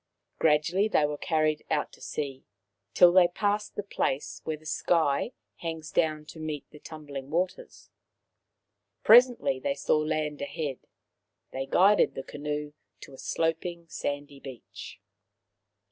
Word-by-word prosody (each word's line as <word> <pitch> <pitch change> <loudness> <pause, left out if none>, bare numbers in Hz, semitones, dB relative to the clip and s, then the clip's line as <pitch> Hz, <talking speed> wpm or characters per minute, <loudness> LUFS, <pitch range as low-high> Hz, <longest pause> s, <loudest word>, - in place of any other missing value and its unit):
Gradually 165 +6 +3
they 155 -8 +3
were 150 0 -2
carried 155 -1 0
out 150 - 0
to - - -17
sea, 135 -3 -4 0.5
till 175 -1 +8
they 180 -1 +6
passed 205 +3 -1
the 205 - -3
place 145 -7 -2
where 155 -1 -2
the 155 - -21
sky 160 - +1 0.3
hangs 160 -2 -5
down 155 -2 +1
to 160 - -11
meet 155 -3 -4
the 150 - -13
tumbling 145 -4 -8
waters. 180 +4 -3 1.1
Presently 240 - +6
they 140 +1 -1
saw 145 +2 +1
land 155 -1 -2
ahead. 145 -2 -4 0.7
They 135 +1 -4
guided 200 +7 +4
the 135 - -5
canoe 150 +1 -5 0.3
to 140 - -11
a - - -12
sloping 165 +1 -2
sandy 145 -1 -4
beach. 130 -6 -10
155 Hz, 135 wpm, -28 LUFS, 145-170 Hz, 1.1 s, till